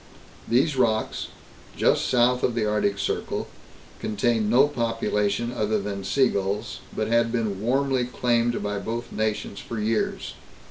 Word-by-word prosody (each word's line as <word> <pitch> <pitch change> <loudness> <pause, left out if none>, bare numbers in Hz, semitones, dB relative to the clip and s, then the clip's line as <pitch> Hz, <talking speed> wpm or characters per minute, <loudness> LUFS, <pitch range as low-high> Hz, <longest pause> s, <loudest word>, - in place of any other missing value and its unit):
These 135 +5 +2
rocks, 110 -3 +1 0.5
just - - +3
south 125 0 +3
of 120 - +1
the 115 -2 +1
Arctic 105 -1 +1
circle, - - -2 0.5
contained 110 0 0
no 130 +5 +6
population 115 -3 -1
other 110 -1 +1
than 100 -1 -4
sea 130 +7 +3
gulls, 100 +3 -2 0.2
but 110 - -1
had 115 0 +2
been 110 -5 -1
warmly 130 +2 +1
claimed 120 -1 0
by 105 0 -2
both 120 +3 -4
nations 110 -2 -2
for 115 - -5
years. 110 +1 -1
115 Hz, 140 wpm, -25 LUFS, 105-120 Hz, 0.5 s, no